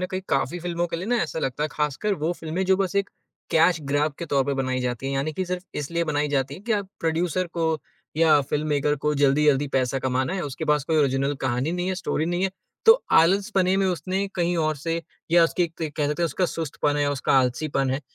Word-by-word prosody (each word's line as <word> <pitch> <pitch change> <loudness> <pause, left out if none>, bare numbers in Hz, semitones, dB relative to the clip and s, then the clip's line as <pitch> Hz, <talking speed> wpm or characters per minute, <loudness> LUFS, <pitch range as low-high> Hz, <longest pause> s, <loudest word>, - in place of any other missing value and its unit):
न 185 - -1
कहीं 185 -1 -2
काफ़ी 135 +6 0
फिल्मों 175 0 -1
के 170 0 -4
लिए 185 +4 -5
ना 245 - +2
ऐसा - - -4
लगता 135 -1 -2
है, - - -1
खासकर 150 +8 -1
वो 160 +1 -1
फिल्में 165 +4 -2
जो 190 0 +4
बस 195 0 -1
एक 200 0 0 0.4
कैश 165 +1 +4
ग्रैब 145 +2 0
के 170 - -5
तौर 140 -2 +2
पर 140 0 -1
बनाई 130 -1 -1
जाती 125 +1 -3
हैं। 135 - -2
यानी 140 +3 -1
कि 185 - -2
सिर्फ 180 0 -3
इसलिए 170 +4 -2
बनाई 150 -1 0
जाती 135 -2 -1
हैं 190 - -12
कि 235 - 0
आप 200 -2 -1
प्रोड्यूसर 170 +2 0
को 160 -2 0 0.4
या 155 -2 +5
फिल्ममेकर 150 -1 +1
को 150 - +2
जल्दी-जल्दी 145 0 +3
पैसा 130 +1 +1
कमाना 130 +6 -1
है। 185 - -2
उसके 140 -3 -5
पास 150 -2 +2
कोई 160 0 0
ओरिजिनल 140 0 +1
कहानी 130 +4 -1
नहीं 180 +1 -2
है, 190 - 0
स्टोरी 165 -3 -2
नहीं 175 +2 -1
है। 195 - 0 0.4
तो 455 +2 +7
आलसपने 190 +2 +3
में 195 -1 +2
उसने 185 +2 -1
कहीं 175 -1 0
और 155 -2 +1
से 165 +3 -3 0.3
या 170 0 +6
उसकी 175 +1 +1 0.2
क 155 - -2
कह 150 -2 +1
सकते 150 +3 -1
हैं - - +4
उसका 180 +3 0
सुस्तपन 150 -2 -2
है, 145 -1 +1
उसका 140 -3 0
आलसीपन 130 +1 0
है। 135 - -1
155 Hz, 235 wpm, -24 LUFS, 140-175 Hz, 0.4 s, तो